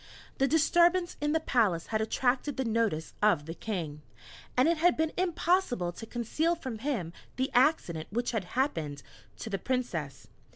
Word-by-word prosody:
The 270 - +4
disturbance 345 +4 +3
in 295 0 +1
the 320 - +3
palace 215 - +1
had 215 - +2
attracted 255 +5 0
the 265 - 0
notice 220 -8 0
of 205 -9 +3
the 165 - -5
King, 165 -7 -4 0.6
and 255 - +5
it 335 0 +3
had 345 +2 +3
been 320 0 0
impossible 345 - +1
to 225 +6 -9
conceal 305 +9 0
from 260 -9 -6
him 220 - -2 0.2
the 260 +1 -1
accident 245 - +2
which 240 +3 -1
had 220 -6 -2
happened 160 - -1 0.3
to 220 - -6
the 195 - -1
Princess. 180 - -3
245 Hz, 165 wpm, -30 LUFS, 185-310 Hz, 0.6 s, and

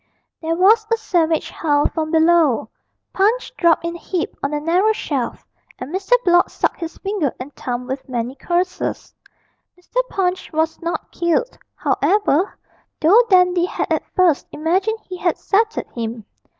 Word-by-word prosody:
There 325 0 -1
was 430 +5 +4
a 455 - +3
savage 335 -7 0
howl 290 -2 +1
from 315 -1 -3
below, 320 -8 +3 0.4
Punch 435 +6 +1
dropped 335 -1 +3
in 340 0 -3
a - - -9
heap 355 -2 -3
on 280 - -1
the 295 0 -2
narrow 360 +8 +2
shelf, 275 - -3 0.3
and 260 +6 -7
Mr. 385 +5 0
Blott 350 0 +4
sucked - - -2
his 330 -2 -6
finger 390 - -1
and 265 +3 -8
thumb 250 0 -4
with 265 +1 -6
many 245 0 -2
curses. 355 +6 -2 0.7
Mr. - - -1
Punch 370 -1 -1
was 320 +1 -1
not 340 0 -4
killed, 345 +9 0 0.2
however, 400 -3 +1 0.4
though 370 +9 +6
Dandy 360 -2 +4
had - - -2
at - - -1
first 360 -6 +3
imagined 375 +8 0
he 370 - -6
had 350 -1 0
settled 440 +2 0
him. 230 -2 -5
340 Hz, 155 wpm, -20 LUFS, 300-380 Hz, 0.7 s, though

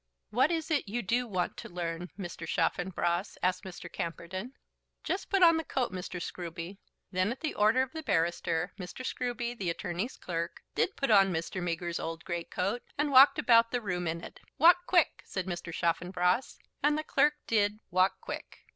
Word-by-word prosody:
"What 260 +6 +4
is 325 -1 -2
it 285 -9 +1
you 240 +3 -2
do 240 +5 +1
want 185 -5 -2
to - - -8
learn, 175 0 -4
Mr. 175 -4 -6
Chaffanbrass?" 175 +2 0
asked 185 +1 +1
Mr. 185 -2 -8
Camperdown. 180 +8 -5 0.5
"Just 380 - -2
put 390 -2 +3
on 330 -1 +7
the 325 - -1
coat, 260 -7 -1
Mr. 180 -1 -5
Scruby." 175 +2 -6 0.3
Then 185 +3 +1
at 255 - -6
the 310 -2 -1
order 220 +5 +4
of 260 - -6
the 320 - -5
barrister, 170 - 0
Mr. 185 +8 -7
Scruby, 245 -1 -2
the 190 -6 -2
attorney's 175 +7 -3
clerk, 170 -1 -4
did 380 - 0
put 275 -4 +1
on 195 -2 +6
Mr. 165 +2 -3
Meager's 170 0 -2
old 165 +1 -5
great 170 -1 -4
coat, 200 +6 -1 0.2
and 295 0 +1
walked 270 +2 +8
about 230 -1 +5
the 245 - 0
room 180 -5 -2
in 165 +1 -3
it. - - -10 0.2
"Walk 350 +3 +6
quick," 350 -4 +3
said 185 -2 -4
Mr. 175 -2 -5
Chaffanbrass; 180 +6 0 0.2
and 295 +1 +3
the 310 - -2
clerk 295 0 +3
did 210 -2 +2
"walk 185 +1 +3
quick." - - -7
190 Hz, 185 wpm, -30 LUFS, 175-250 Hz, 0.5 s, walked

